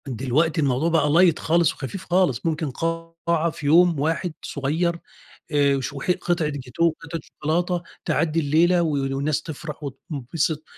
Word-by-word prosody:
دلوقتي 135 +6 0
الموضوع 140 +3 +1
بَقى 160 -3 +2
light 170 -1 +5
خالص 170 +1 +2
وخفيف 165 +8 -7
خالص، 175 -9 +1
ممكن 160 -2 -1
قاعة 165 +2 -1
في 150 - -8
يوم 170 +1 +5
واحد 165 +3 -1
صغيّر، 165 +5 -1 0.5
آآ، 140 -2 +3
وشو 140 +1 -4
حت 180 +5 +1
قِطعة 170 -3 +1
جاتوه 140 +3 -1
وقِطعة 165 0 -4
شوكولاتة 170 +3 -1 0.2
تعدِّي 165 0 +1
الليلة 165 +4 +3
وال 140 -5 0
الناس 145 +2 0
تفرح 155 -1 -7
وتنبسط 145 +2 -3
160 Hz, 145 wpm, -23 LUFS, 140-170 Hz, 0.5 s, light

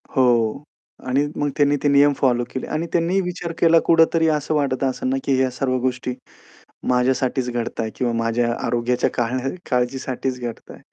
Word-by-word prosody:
हो. 120 0 +2 0.4
आणि 135 +3 +2
मग 145 0 0
त्यांनी 145 0 +3
ते - - +3
नियम 140 +1 +5
फॉलो 120 -2 +1
केले 130 - -5
आणि 160 +2 -1
त्यांनी 175 +3 +1
विचार 175 -1 -4
केला 165 -1 +5
कुठेतरी 165 0 +4
असं 150 +1 -2
वाटतं 135 -2 0
असेल 255 - -3
ना 265 - +1
की 135 - +1
ह्या 130 -1 +2
सर्व 130 0 -1
गोष्टी 125 0 -2 0.8
माझ्यासाठीच 125 0 +1
घडताय 115 -2 -3
किंवा 120 -2 0
माझ्या 120 +1 0
आरोग्याच्या 120 +1 0
काळ 120 +1 -1 0.3
काळजीसाठीच 125 0 -1
घडताय. 120 -2 -7
130 Hz, 160 wpm, -21 LUFS, 125-145 Hz, 0.8 s, नियम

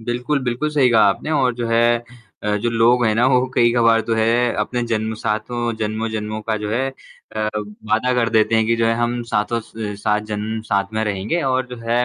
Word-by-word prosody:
बिल्कुल, 125 +5 -1
बिल्कुल 120 +5 -1
सही 145 -4 +3
कहा 115 -2 +5
आपने 100 +10 -2
और 130 -5 +2
जो 120 0 -3
है 115 +1 +3 0.4
अ, 105 0 +1
जो 115 +3 -1
लोग 120 +2 +3
हैं 110 - +2
ना 120 +3 +3
वो 130 -1 +3
कई-कभार 120 -1 +4
तो - - +3
है, 115 +2 +2
अपने 125 -1 -1
जन्म 110 0 -1
सातों 115 +3 -2
जन्मों-जन्मों 110 0 -3
का 110 0 -1
जो - - -3
है, 130 +4 0 0.5
अ, - - -2
अब 105 -1 -3
वादा 115 +4 +2
कर 120 -2 +2
देते 110 0 +3
हैं 110 0 +3
कि 115 +1 +2
जो 115 0 +1
है 115 - +2
हम 120 +1 -1
साथों 115 +2 0
स - - -20 0.3
सात 105 -1 +1
जन्म 110 +2 -3
साथ 100 +1 0
में 110 - 0
रहेंगे 105 - -1
और 130 0 0
जो - - -11
है, 120 +1 +2
115 Hz, 220 wpm, -20 LUFS, 110-120 Hz, 0.5 s, कहा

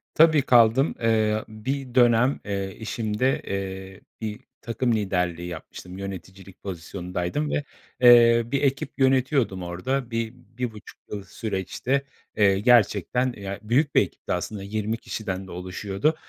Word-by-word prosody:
Tabii, 160 -2 +6
kaldım. 120 +3 +4
Eee, 110 -1 +2
bir 125 +4 -5
dönem, 120 +2 +4
eee, 100 -2 -3
işimde, 110 +3 -1
eee, 95 0 -5 0.2
bir 110 0 -4 0.2
takım 115 +1 0
liderliği 90 -4 -1
yapmıştım, 90 +2 -9
yöneticilik 95 -1 -9
pozisyonundaydım 90 - -3
ve, 145 - 0 0.4
eee, 120 -1 +7
bir 135 +4 -1
ekip 140 -1 0
yönetiyordum 130 -7 +2
orada. 120 +9 -3
Bi 115 0 -2 0.2
bir 125 -2 -2
buçuk 105 -1 -13
yıl 100 -1 -4
süreçte, 110 +7 -2 0.3
eee, 100 -2 +4
gerçekten 120 +2 +3
ya, 100 -1 -5
büyük 130 +7 +1
bir - - +7
ekipti - - -4
aslında, 95 +3 -4
20 105 +2 -2
kişiden 95 -5 -5
de - - -10
oluşuyordu. 95 - -1
110 Hz, 135 wpm, -25 LUFS, 95-125 Hz, 0.4 s, eee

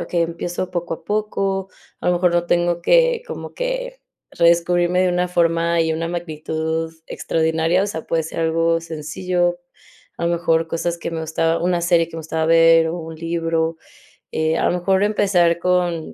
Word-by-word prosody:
okey, 170 -1 -1
empiezo 175 +2 -4
poco 175 -2 -3
a - - -16
poco, 195 -2 -1 0.3
a - - -5
lo - - +4
mejor 175 0 +2
no 175 0 +1
tengo 175 0 +1
que - - +3
como 475 - -7
que - - -3 0.3
redescubrirme 175 +1 +2
de 185 - +2
una 180 0 +1
forma 170 -1 +1
y 160 -1 +1
una 165 +1 -2
magnitud 160 -1 -3 0.2
extraordinaria, 160 +3 0
o 205 - -1
sea, 160 -5 -5
puede 165 -1 0
ser 160 - -7
algo 165 0 +1
sencillo, 175 +2 -2 0.6
a 170 - -2
lo - - +1
mejor 165 -1 +1
cosas 170 +1 -2
que 170 - -5
me 165 -1 -4
gustaba 165 +1 0
una 175 0 +1
serie 170 -1 +2
que 165 - -9
me 165 - -4
gustaba 160 0 -2
ver 165 0 +6
o 170 +2 -3
un 160 -1 -8
libro, 165 0 -1 0.6
eh, 160 +1 0
a - - +1
lo - - +3
mejor 190 +2 +2
empezar 190 -5 +2
con 175 -3 0
170 Hz, 180 wpm, -20 LUFS, 165-180 Hz, 0.6 s, ver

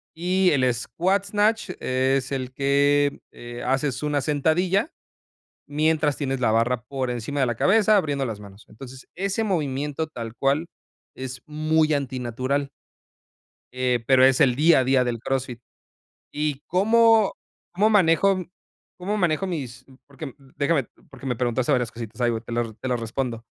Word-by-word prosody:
y 180 +2 +2
el 130 -3 +3
squat 185 +11 -1
snatch 210 0 +1
es 130 +1 0
el 130 -2 -3
que, 140 +1 +2
eh, 120 0 -9
haces 135 +1 -1
una 145 -1 0
sentadilla, 170 - +1 0.8
mientras 150 0 +1
tienes 135 -2 -2
la 120 -3 +2
barra 115 +2 +1
por 130 -1 -3
encima 120 +4 -4
de 135 - +3
la 120 - -1
cabeza, 215 - +4
abriendo 145 -7 0
las 110 -4 -5
manos. 100 0 -14
Entonces, 130 +3 -12
ese 195 +4 -1
movimiento 150 -5 -2
tal 115 -7 -7
cual, 140 +5 +1 0.5
es 130 -1 -7
muy 155 +1 +1
antinatural. 130 0 -2 1.0
Eh, 125 -2 0
pero 130 -1 +5
es 130 -1 +4
el 125 -2 +5
día 155 +3 +5
a - - 0
día 130 0 +3
del 120 -1 -2
Crossfit, 125 0 -3 0.7
¿y 150 -2 -2
cómo 220 +3 +4 0.4
cómo 210 +5 +2
manejo 190 -1 +3 0.5
cómo 195 +4 -2
manejo 175 -2 +1
mis-?, 130 -9 -5 0.2
porque 140 -1 -9 0.2
déjame 145 -3 +1 0.2
porque 135 - -11
me 125 -2 -1
preguntaste 125 +3 0
varias 125 -4 +1
cositas, 115 0 -9
ahí 120 -1 +3
voy, 115 -1 -2
te 115 +1 -10
las 115 -1 -2
te 130 - -4
las 125 -2 -1
respondo. 115 0 -4
140 Hz, 155 wpm, -24 LUFS, 125-160 Hz, 1.0 s, pero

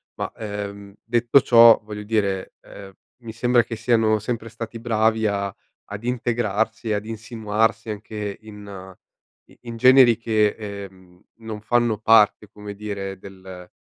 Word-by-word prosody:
Ma, - - -4
ehm, 100 -2 -7
detto 120 +3 +3
ciò, 115 -2 +7
voglio 105 -1 -7
dire, 100 -3 -2
ehm, 100 -1 -12 0.3
mi 115 -2 -9
sembra 120 +1 +2
che 115 - -6
siano 110 -1 +2
sempre 115 +1 -4
stati 115 +1 -8
bravi 110 -1 +1
a 100 -1 -2 0.4
ad 105 +2 -7
integrarsi 115 -2 -2
e 105 - +1
ad 105 0 -3
insinuarsi 110 0 -2
anche 105 -1 -6
in 100 -3 -11 0.5
i - - -20
in 120 -1 -7
generi 130 0 +6
che, 110 -2 +1
ehm, 95 -4 -10 0.2
non 110 -2 -7
fanno 120 -1 +1
parte, 110 -1 +4
come 105 -1 -10
dire, 100 -2 -6
del 95 -2 -12
110 Hz, 145 wpm, -22 LUFS, 100-115 Hz, 0.5 s, ciò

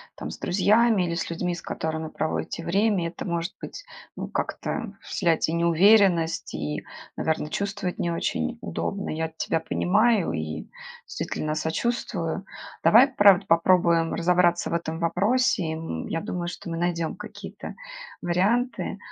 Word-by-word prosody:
там, - - -6
с - - -9
друзьями 210 +2 +3
или 170 -1 -1
с 170 - -3
людьми, 175 +1 -2
с 170 - -6
которыми 160 0 -3
проводите 160 +1 -3
время. 195 -1 +2
Это 170 - -7
может 170 -1 -2
быть, - - -8 0.3
ну, - - -5
как-то 225 -4 -3
вселять 165 -2 +1
и 160 - -2
неуверенность, 170 0 +4
и, 75 0 -3 0.3
наверно, 160 -1 -1
чувствовать 200 -2 -3
не 170 - 0
очень 80 - -2
удобно. 195 - -3
Я 160 +1 -2
тебя 165 - 0
понимаю 210 +3 +2
и, 80 -1 -4 0.4
действительно, 155 0 -3
сочувствую. 170 +2 -2 0.4
Давай, 240 +5 +7
правда, 200 -7 +5
попробуем 170 -1 +3
разобраться 175 0 +2
в - - -2
этом 160 -1 -2
вопросе. 205 +5 +2
И, 160 - -2
м, 160 - -5
я 165 - -2
думаю, 175 +1 -4
что 175 0 -6
мы 165 - -3
найдем 170 -2 -1
какие-то - - -9 0.5
варианты. 205 +6 0
175 Hz, 145 wpm, -25 LUFS, 165-200 Hz, 0.5 s, Давай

